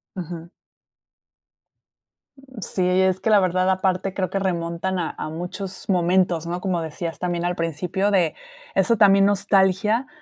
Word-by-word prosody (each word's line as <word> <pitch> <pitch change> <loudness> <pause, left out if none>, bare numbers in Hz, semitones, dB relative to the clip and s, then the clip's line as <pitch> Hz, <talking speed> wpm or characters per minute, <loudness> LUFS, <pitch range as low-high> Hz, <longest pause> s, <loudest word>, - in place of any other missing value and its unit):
Ujú. 170 -2 -7 2.3
Sí, 185 - 0
y 180 +1 +3
es 190 0 +1
que - - 0
la 210 -2 +6
verdad, 185 0 +1
aparte, 190 0 0
creo 185 -2 -2
que 195 - -2
remontan 180 0 -2
a, 165 - -2
a - - -4
muchos 180 +4 -6
momentos, 180 -2 +2
¿no? 175 +1 -3
Como 180 -2 -1
decías 165 +1 -5
también 175 -1 -2
al 175 0 -1
principio, 170 +5 -1
de 180 -5 +2 0.4
eso 195 +4 +3
también, 195 -2 +6
nostalgia 200 +4 +2
185 Hz, 145 wpm, -22 LUFS, 170-195 Hz, 2.3 s, la